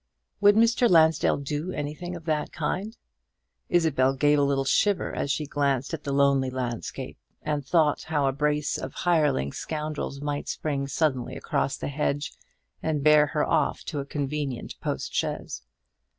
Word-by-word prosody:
Would 205 0 +6
Mr. 230 +2 +4
Lansdell 160 -2 +4
do 145 +5 -3
anything 155 +4 -5
of 170 -2 -10
that 155 -2 -1
kind? 210 +5 -3 0.7
Isabel 140 -6 +2
gave 145 +2 +3
a - - +3
little 140 -1 +1
shiver 195 +7 +2
as - - -2
she 150 +2 0
glanced 140 -1 0
at 155 -2 -5
the 140 - -2
lonely 140 -1 +3
landscape, 125 -3 -5 0.2
and 150 -2 -1
thought 150 +1 +2
how 150 -3 0
a 135 - +3
brace 150 +1 0
of 130 - -6
hireling 150 - +2
scoundrels 150 -2 -4
might 145 0 -3
spring 140 -3 -2
suddenly 135 -3 -1
across 135 - -1
the - - -4
hedge, 145 0 -2 0.5
and 155 -3 -1
bear 150 0 +6
her 150 +1 0
off 155 -4 +1
to 150 - -4
a 140 - -4
convenient 140 -3 -3
postchaise. - - -3
150 Hz, 155 wpm, -26 LUFS, 140-160 Hz, 0.7 s, Would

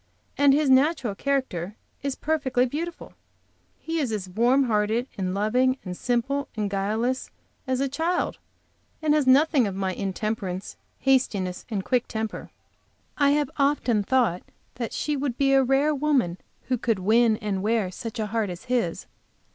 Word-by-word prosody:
And 285 -1 +5
his 295 +1 +3
natural 265 -3 +3
character 215 -7 -2 0.3
is 275 -1 -2
perfectly 275 -5 +1
beautiful. 325 +6 -5 0.6
He 330 0 -3
is 265 -7 -1
as 205 -3 -3
warm 240 +8 +3
hearted 220 +1 +1
and 185 -1 -2
loving 250 +6 +2
and 180 -1 -5
simple 270 +6 -1
and 205 -2 -1
guileless 220 +6 -1 0.4
as 260 -1 0
a 275 - +1
child, 325 +6 -1 0.6
and 310 -1 +2
has 300 -3 +2
nothing 275 -2 +5
of 195 - -4
my 190 -1 -1
intemperance, 195 -1 -3 0.3
hastiness 205 -9 +1
and 200 -4 -3
quick 250 -2 +1
temper. 220 -1 -4 0.7
I 285 -1 +5
have 295 -3 -1
often 275 -6 +2
thought 220 -5 +1 0.3
that 235 -2 -4
she 300 - -1
would 270 -3 -2
be 275 -1 +3
a 270 - +6
rare 270 +4 +2
woman 275 - +1 0.2
who 255 -2 -1
could 225 -2 +1
win 220 +4 +3
and 205 -4 -2
wear 215 -2 0
such 230 +4 -7
a 220 - -1
heart 220 -1 -1
as 175 0 -7
his. 240 -9 -1
245 Hz, 160 wpm, -25 LUFS, 205-275 Hz, 0.7 s, a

